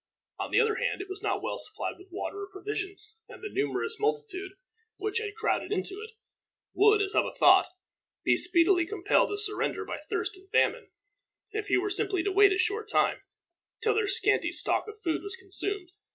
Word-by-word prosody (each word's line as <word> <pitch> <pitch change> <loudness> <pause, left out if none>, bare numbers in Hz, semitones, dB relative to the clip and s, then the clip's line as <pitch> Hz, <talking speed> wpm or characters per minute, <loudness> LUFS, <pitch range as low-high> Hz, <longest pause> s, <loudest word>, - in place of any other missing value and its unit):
On - - -3
the - - +3
other 445 -2 +2
hand, - - -1
it 390 - -5
was 380 +1 -5
not 415 -1 -1
well - - -3
supplied 420 - -4
with 370 - -15
water 395 +2 -5
or 400 - -7
provisions, 415 +1 -5 0.2
and - - -12
the 420 - -6
numerous 435 +3 -1
multitude 425 -3 -2 0.4
which 425 +2 -1
had 425 -2 -5
crowded 445 -1 -1
into 395 0 -3
it, 445 0 -11 0.6
would, 420 +1 +5
as 390 - -3
Hubba - - +1
thought, - - +6 0.6
be - - +4
speedily 350 0 +3
compelled 405 0 +2
to 410 - -2
surrender 420 0 -1
by - - -5
thirst - - -3
and 380 +1 -19
famine, - - +2 0.6
if 425 0 -3
he - - +3
were 400 +2 -1
simply 390 -3 0
to 400 - 0
wait 400 +1 +6
a 380 - +1
short 430 +3 0
time, - - +2 0.6
till 445 -1 +2
their 435 -1 +1
scanty 395 -3 +3
stock 350 - +1
of 430 0 -9
food 325 -2 0
was 400 0 -5
consumed. 385 -1 -4
405 Hz, 195 wpm, -29 LUFS, 380-430 Hz, 0.6 s, thought